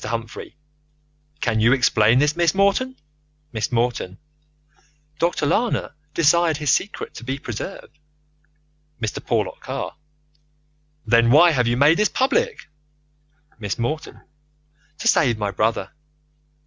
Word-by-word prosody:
Humphrey. 115 0 -6 0.9
Can 110 -2 0
you 115 +3 +4
explain 120 -3 +3
this, 150 +3 +2
Miss 170 -1 +2
Morton? 200 +7 +1 0.6
Miss 110 0 -2
Morton: 115 -6 -1 1.0
Dr. 170 -2 0
Lana 220 +3 0 0.2
desired 165 0 +3
his 150 -3 0
secret 200 +8 -2
to - - -10
be 135 +3 -3
preserved. 135 - -8 1.0
Mr. 110 -3 -4
Porlock - - -1
Carr: - - -5 1.1
Then 115 0 +4
why 165 +7 +7
have 125 -5 +1
you 120 +1 +1
made 150 +6 +4
this 210 - +3
public? 460 - 0 0.9
Miss 105 -3 -3
Morton: 155 +7 -4 0.8
To 230 - -3
save 125 - +3
my 105 -2 -2
brother. 105 0 -1
135 Hz, 120 wpm, -22 LUFS, 115-170 Hz, 1.1 s, why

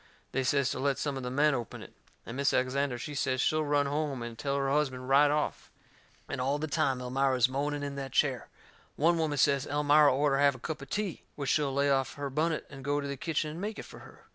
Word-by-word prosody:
They 135 - 0
says 140 0 +2
to - - -4
let 140 0 +1
some 145 -2 -2
of 135 - -4
the 125 - -4
men 145 +3 +3
open 120 -4 -5
it. - - -14 0.3
And 115 - -7
Mis' 140 +1 +1
Alexander, 130 0 0
she 145 +5 -6
says 130 -2 -1
she'll 155 +4 +2
run 145 -1 +2
home 140 -3 -2
and 120 -1 -6
tell 140 +4 -2
her 135 -1 0
husband 130 -3 0
right 145 +2 +6
off. 150 +1 -2 0.6
And - - -4
all 135 +3 +1
the 150 - -3
time 135 -3 0
Elmira 130 +1 0
is 125 0 +5
moaning 145 +2 -2
in 140 -1 -4
that 135 -1 -5
chair. 130 -2 +1 0.5
One 165 +3 +2
woman 155 -3 0
says 140 -1 +2
Elmira 145 +1 +4
orter 140 +1 +2
have 140 -1 +4
a - - -11
cup 155 +3 -5
o' - - -7
tea, 205 +3 -3
which 140 -2 -1
she'll 145 -3 +1
lay 140 +1 +2
off 135 -1 0
her 140 -1 -4
bunnet 155 +3 0
and 135 -1 -11
go 145 +1 0
to 140 - -4
the 140 - -3
kitchen 150 +3 -2
and 165 +4 -7
make 210 +2 -4
it - - -6
fur - - -12
her. - - -16
140 Hz, 250 wpm, -30 LUFS, 135-150 Hz, 0.6 s, right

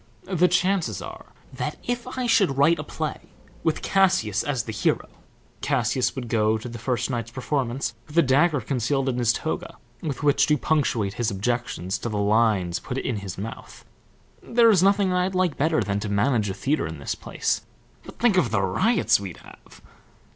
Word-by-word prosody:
The 180 -2 +2
chances 180 0 +1
are - - -9 0.3
that - - -4
if 245 0 -2
I 255 - -1
should 195 - +3
write 155 +5 +4
a - - -3
play - - -4 0.4
with - - 0
Cassius 185 - +2
as 135 -6 -1
the 110 - -6
hero, 105 - 0 0.5
Cassius 125 -2 0
would 130 -3 -5
go 110 -1 +2
to 110 - -8
the 120 -1 -7
first 120 +1 -1
night's 115 -2 -3
performance 130 0 -2
with 155 +1 -9
a 170 - +7
dagger 145 +2 +3
concealed 135 +3 -1
in 125 -1 -1
his 120 -2 +3
toga, - - -4 0.2
with 145 -4 -4
which 145 -1 +4
to 150 - +3
punctuate 125 -10 0
his 120 -1 -1
objections 100 -3 -2
to 120 - -4
the 105 - -3
lines 100 -4 +2
put 130 - -5
in 130 -4 -2
his 100 -3 -6
mouth. 110 +4 -8 0.6
There 230 -1 +4
is 190 -5 +4
nothing 195 -1 +3
I'd 180 +1 0
like 185 -4 +1
better 155 -4 +1
than 100 +1 -1
to 105 0 -4
manage 105 +1 +1
a 95 - -4
theatre 145 - 0
in 80 0 -7
this 70 - -3
place, - - -2 0.4
but - - -12
think 225 -5 +3
of 135 -10 +3
the 105 -2 +1
riots 115 - +2
we'd 95 -4 -7
have! - - -16
125 Hz, 190 wpm, -24 LUFS, 110-170 Hz, 0.6 s, a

